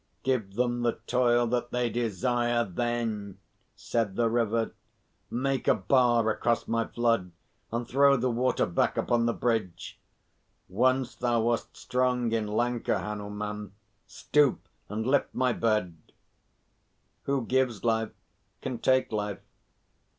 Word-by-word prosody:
"Give 115 -7 -1
them 120 0 0
the 120 -1 +2
toil 120 -1 +3
that 120 +1 -1
they 125 0 0
desire, 120 +1 0
then," 110 -1 -3 0.4
said 110 -5 -2
the 115 -1 +1
River. 115 -1 0 0.6
"Make 135 +1 -1
a - - +5
bar 120 +2 +3
across 115 +1 0
my 115 0 0
flood 115 -6 0 0.4
and 115 +1 -2
throw 140 +2 +5
the 125 +1 0
water 125 +2 +1
back 85 - 0
upon 120 -1 +1
the 115 - +1
bridge. 110 -8 -2 0.7
Once 130 0 +1
thou 120 -2 0
wast 115 +1 -1
strong 125 -2 0
in 110 -2 0
Lanka, 120 +3 0
Hanuman. 105 -1 -5 0.3
Stoop 145 -2 +1 0.2
and 110 +2 -3
lift 135 +2 +1
my 125 -1 +2
bed." 105 -8 0 1.3
"Who 140 -3 0
gives 125 -3 0
life 110 -1 +1 0.5
can 130 -3 -3
take 130 0 +2
life." 105 -2 -3
120 Hz, 130 wpm, -28 LUFS, 110-125 Hz, 1.3 s, a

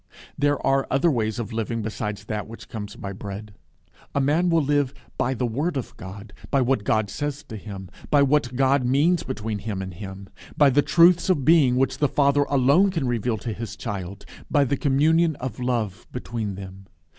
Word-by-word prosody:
There 145 0 +1
are 135 0 +2
other 145 +6 +3
ways 110 -5 -1
of 115 -1 -4
living 115 0 -2
besides 105 -1 -4
that 105 -1 -4
which 115 +1 -11
comes 105 -2 -7
by 100 0 -6
bread. 100 +1 -8 0.6
A - - +3
man 155 +6 +2
will 165 -2 +3
live 145 -1 +1 0.2
by 130 +1 0
the 125 - -1
word 140 +8 -1
of 130 - -5
God, 100 +3 -10 0.2
by 140 - +2
what 130 -3 +1
God 110 -1 +1
says 145 -1 -4
to 110 - -9
him, 100 -2 -8 0.2
by 145 -1 +5
what 140 -3 +1
God 135 +1 +3
means 145 +8 +3
between 110 -4 -4
Him 100 -2 -4
and 95 -1 -5
him, 95 +1 -8 0.3
by 145 -2 +6
the 145 +3 +4
truths 170 +4 +4
of 150 -8 +2
being 150 -6 +5
which 135 +1 +1
the 145 - +3
Father 145 0 +3
alone 140 +8 +4
can 165 -7 -2
reveal 120 -1 0
to 115 +1 -4
his 115 +1 -6
child, 100 -3 -6 0.2
by 145 -2 +4
the 140 +1 0
communion 155 +4 +2
of 125 -4 -6
love 115 -5 -2
between 115 -5 -4
them. 95 0 -10
125 Hz, 195 wpm, -24 LUFS, 105-145 Hz, 0.6 s, by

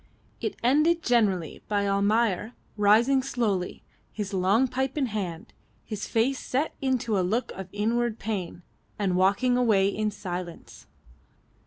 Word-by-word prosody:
It 425 - -3
ended 305 +7 +3
generally 200 - +1
by 205 -1 0
Almayer 210 +2 +1 0.2
rising 220 +6 +4
slowly, 210 -8 -2 0.3
his 205 -2 -5
long 195 +7 +3
pipe 265 +2 -2
in 280 - +2
hand, 190 -8 -5 0.3
his 210 -2 -5
face 250 +4 +1
set 280 +5 -1
into 245 -6 0
a - - +3
look 215 +8 -1
of 190 -1 -8
inward 230 +2 0
pain, 190 -5 -4 0.3
and 195 -3 0
walking 200 +7 +3
away 210 -6 +3
in 215 +1 -1
silence. 180 -4 -7
215 Hz, 135 wpm, -26 LUFS, 195-245 Hz, 0.3 s, rising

